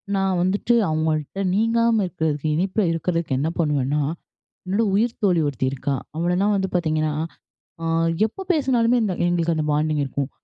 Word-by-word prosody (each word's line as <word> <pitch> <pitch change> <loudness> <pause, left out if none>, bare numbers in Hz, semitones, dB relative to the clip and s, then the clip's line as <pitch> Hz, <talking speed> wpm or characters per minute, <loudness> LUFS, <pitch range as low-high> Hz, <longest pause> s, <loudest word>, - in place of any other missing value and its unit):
நான் 195 -2 +1
வந்துட்டு 200 +6 +1 0.2
அவங்கள்ட்ட 155 +3 -1
நீங்காம 230 0 +2
இருக்குறதுக்கு, 160 -4 -2
இணைப்புல 190 +5 0
இருக்குறதுக்கு 165 -4 -1
என்ன 155 +3 0
பண்ணுவன்னா, 150 -2 +1 0.7
என்னோட 210 +4 +1
உயிர்த்தோழி 205 -5 +1
ஒருத்தி 130 -1 -2
இருக்கா, 140 +1 -2 0.2
அவளலாம் 180 +5 +1
வந்து 190 -1 -1
பாத்தீங்கன்னா, 155 -3 0 0.7
அ - - -2 0.4
எப்ப 385 - -9
பேசினாலுமே 250 -5 +2
இந்த 195 - 0
எங்களுக்கு 170 -1 +1
அந்த 155 - 0
பாண்டிங் 150 0 +1
இருக்கும். 135 0 -3
175 Hz, 140 wpm, -22 LUFS, 155-205 Hz, 0.7 s, நீங்காம